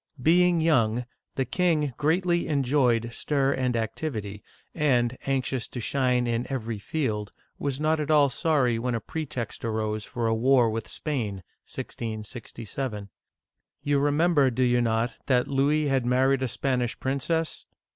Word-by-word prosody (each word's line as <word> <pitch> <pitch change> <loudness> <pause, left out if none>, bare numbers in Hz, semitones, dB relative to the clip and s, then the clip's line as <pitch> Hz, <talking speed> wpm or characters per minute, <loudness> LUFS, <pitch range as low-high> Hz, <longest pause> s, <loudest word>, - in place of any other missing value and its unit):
Being 170 +4 +4
young, 125 -7 +2 0.3
the 135 - 0
king 155 -2 +1
greatly 170 +3 +1
enjoyed 130 -5 +2
stir 140 -1 +1
and 125 -2 0
activity, 110 -3 -3 0.3
and, 130 -6 +2
anxious 130 -2 -1
to 125 - -7
shine 125 0 +1
in 120 +1 -1
every 115 -5 -3
field, 105 -5 -2 0.3
he - - -10
was 140 -1 -1
not 155 +1 +1
at 150 0 -3
all 150 -2 +5
sorry 135 -4 +1
when 125 0 -1
a - - -1
pretext 130 -2 -5
arose 110 -1 -2
for 120 +2 -4
a 115 - +2
war 120 0 +4
with 110 0 -4
Spain 110 - -3 0.3
(1667). 110 0 -6 0.7
You 145 -1 +2
remember, 145 0 +3
do 130 +1 0
you 120 -1 +3
not, 115 +1 0
that 125 -2 +3
Louis 145 +3 +2
had 135 -2 +1
married 130 +2 +2
a 130 - +1
Spanish 125 0 -1
princess. 145 +5 -2
130 Hz, 145 wpm, -26 LUFS, 115-145 Hz, 0.7 s, all